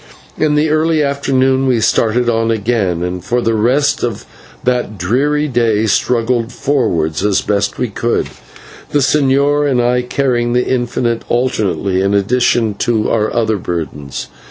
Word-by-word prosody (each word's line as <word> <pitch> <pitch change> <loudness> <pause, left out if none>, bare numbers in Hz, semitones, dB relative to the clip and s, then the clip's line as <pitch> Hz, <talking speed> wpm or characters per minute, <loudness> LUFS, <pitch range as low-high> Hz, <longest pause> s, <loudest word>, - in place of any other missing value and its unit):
In 150 -1 +1
the 150 +1 +2
early 155 0 +2
afternoon 135 -1 +1
we 125 -3 +2
started 115 +2 +1
on 115 -1 +1
again, 105 -6 0
and 90 0 -4
for 120 +1 0
the 115 -1 0
rest 130 +7 +1
of 120 -4 -3 0.4
that 125 -4 -1
dreary 140 - 0
day 115 -4 +1
struggled 115 +2 0
forward 110 - -1
as 100 -1 +1
best 100 0 -1
we 125 - -1
could, 115 +2 -1 0.6
the - - 0
señor 145 +1 +2
and 130 -2 +1
I 125 +1 +2
carrying 125 -1 -1
the 125 0 +1
infant 120 -2 -1
alternately 100 -7 0
in 100 +1 +1
addition 115 +1 +1
to 110 -3 0
our 110 -1 +1
other 110 -2 0
burdens. 80 -6 -5
120 Hz, 150 wpm, -15 LUFS, 105-130 Hz, 0.6 s, the